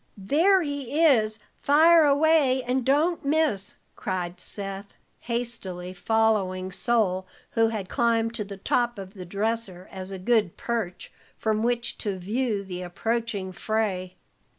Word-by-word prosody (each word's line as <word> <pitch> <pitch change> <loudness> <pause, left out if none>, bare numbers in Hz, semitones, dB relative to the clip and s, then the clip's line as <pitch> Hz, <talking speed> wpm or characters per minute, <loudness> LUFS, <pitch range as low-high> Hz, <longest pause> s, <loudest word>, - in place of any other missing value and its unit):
"There 330 - +3
he 285 -1 -3
is! 220 -7 +4 0.2
Fire 320 +3 +6
away, 285 -3 +4
and 255 +1 0
don't 305 +7 +2
miss!" 280 -9 0 0.2
cried 180 -1 -3
Seth, 195 +1 -4 0.2
hastily 230 -7 -4
following 190 -2 +1
Sol, 190 -3 0 0.2
who 225 0 +3
had 215 -4 -3
climbed 230 +1 +1
to 230 -2 -3
the 200 -1 -9
top 240 +4 0
of 195 -1 -8
the 185 -3 -8
dresser 200 -1 -3
as 190 0 -7
a 195 - -5
good 210 -1 +1
perch 225 -7 -3 0.3
from 220 -1 0
which 240 0 -1
to 200 -4 -2
view 210 +2 -1
the 180 -2 -6
approaching 205 +1 -2
fray. 190 -2 -2
220 Hz, 135 wpm, -26 LUFS, 190-245 Hz, 0.3 s, Fire